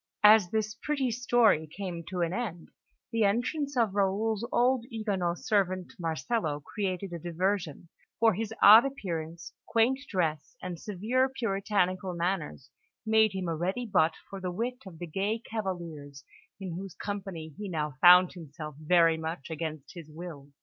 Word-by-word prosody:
As 210 -3 +7
this 215 +1 -1
pretty 265 +1 -1
story 230 -8 +3
came 175 0 -6
to 180 -2 -3
an 170 0 0
end, 190 -7 -4 0.4
the 230 -2 +1
entrance 255 +7 0
of 225 -5 +2
Raoul's 205 +2 0
old 250 0 +3
Huguenot 200 -7 -1
servant, 185 -3 0
Marcello, 160 - -1
created 185 +3 -4
a 170 - -4
diversion; 175 -1 -2 0.3
for 225 -1 +5
his 220 +3 -3
odd 215 +3 +10
appearance, 170 -10 -5
quaint 235 +4 +2
dress, 165 - -1
and 180 -2 -6
severe 220 +8 0
puritanical 195 -6 -1
manners 170 -6 -3 0.3
made 220 -1 +4
him 190 -2 -3
a 165 - -1
ready 190 +9 -2
butt 160 -7 +2
for 195 -1 -8
the 185 - -2
wit 245 +7 -3
of 175 -4 -11
the 175 - -5
gay 195 +7 -1
cavaliers 170 - -6 0.4
in 190 -2 -5
whose 190 +1 -7
company 195 -6 -5
he 205 -1 -6
now 150 -3 -2
found 180 0 +8
himself 155 -3 -9
very 165 0 +4
much 160 -1 -5
against 155 -3 -5
his 165 -4 -10
will. 155 -3 -9
185 Hz, 155 wpm, -29 LUFS, 165-220 Hz, 0.4 s, odd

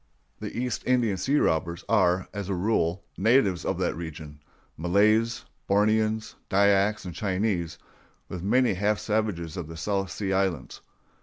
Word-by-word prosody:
The - - -6
East 125 0 -2
Indian 120 -5 +2
sea 135 +10 +1
robbers 85 - 0
are, 95 -4 +2
as 100 -2 -5
a 95 - 0
rule, 90 -2 0 0.2
natives 100 -5 +3
of - - -1
that - - -1
region—Malays, 85 +7 -1 0.2
Borneans, 110 +2 +2 0.2
Dyaks, 100 +1 +3
and 90 - -6
Chinese, 95 -4 -1 0.5
with 90 - -6
many 120 +5 +2
half 105 +3 +1
savages 105 -8 -2
of 85 -4 -5
the 80 0 -9
South 95 +3 -1
Sea 95 +2 -3
Islands. 95 -6 -1
100 Hz, 140 wpm, -26 LUFS, 85-110 Hz, 0.5 s, natives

